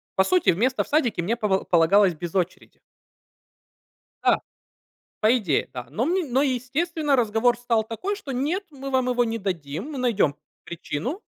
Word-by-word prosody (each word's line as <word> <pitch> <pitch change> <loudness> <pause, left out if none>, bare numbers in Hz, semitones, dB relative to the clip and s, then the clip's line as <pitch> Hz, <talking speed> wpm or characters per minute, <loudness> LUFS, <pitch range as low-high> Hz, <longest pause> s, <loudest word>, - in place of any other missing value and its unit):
По 190 - +4
сути, 365 - +2
место 245 +9 +2
в - - -17
садике 245 - +1
мне 220 +7 0
пова 195 -4 0
полагалось 180 +3 +4
без 170 +1 -6
очереди. 185 -2 -3 1.4
Да. - - +4 0.8
По 225 +4 +4
идее, 180 - 0
да. 125 -1 -6
Но 225 - -1
мн 340 -7 -1
но, 265 - +3
естественно, 290 +4 0
разговор 230 0 +2
стал 230 -3 +1
такой, 365 - -4
что: 290 -10 -7
"Нет, 305 +10 -1
мы 275 -1 -7
вам 260 -1 +1
его 245 -1 +2
не 230 0 -2
дадим. 180 - -4
Мы 275 - -5
найдем 215 - +2 0.3
причину". 200 - -5
240 Hz, 165 wpm, -24 LUFS, 190-275 Hz, 1.4 s, По